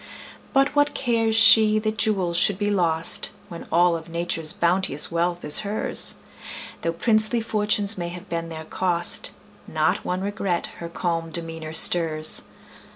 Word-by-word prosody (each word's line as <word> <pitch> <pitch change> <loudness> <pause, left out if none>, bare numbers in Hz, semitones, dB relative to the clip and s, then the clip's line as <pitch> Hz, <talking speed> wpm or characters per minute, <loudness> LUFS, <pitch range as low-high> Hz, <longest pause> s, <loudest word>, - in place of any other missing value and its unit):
But 275 +1 +1
what 290 0 +1
cares 230 -3 0
she 220 -1 +6
that 215 0 -3
jewels 190 -5 -1
should 185 +2 +4
be 205 0 -2
lost, 165 -4 0 0.2
When 170 -1 -10
all 175 +1 +2
of 165 0 -9
Nature's 165 -2 -3
bounteous 170 -4 -1
wealth 175 +1 -2
is 150 - +4
hers? 210 +1 +1 0.7
Though 165 - -2
princely 220 +5 +2
fortunes 210 -2 -1
may 170 - -4
have 175 0 -11
been 165 0 -5
their 160 -1 -9
cost, 175 0 0 0.4
Not - - -1
one 180 +1 -4
regret 195 -3 -3
her 170 - -8
calm 165 -1 -4
demeanor 165 -1 -6
stirs. 160 -1 +4
175 Hz, 150 wpm, -22 LUFS, 165-215 Hz, 0.7 s, she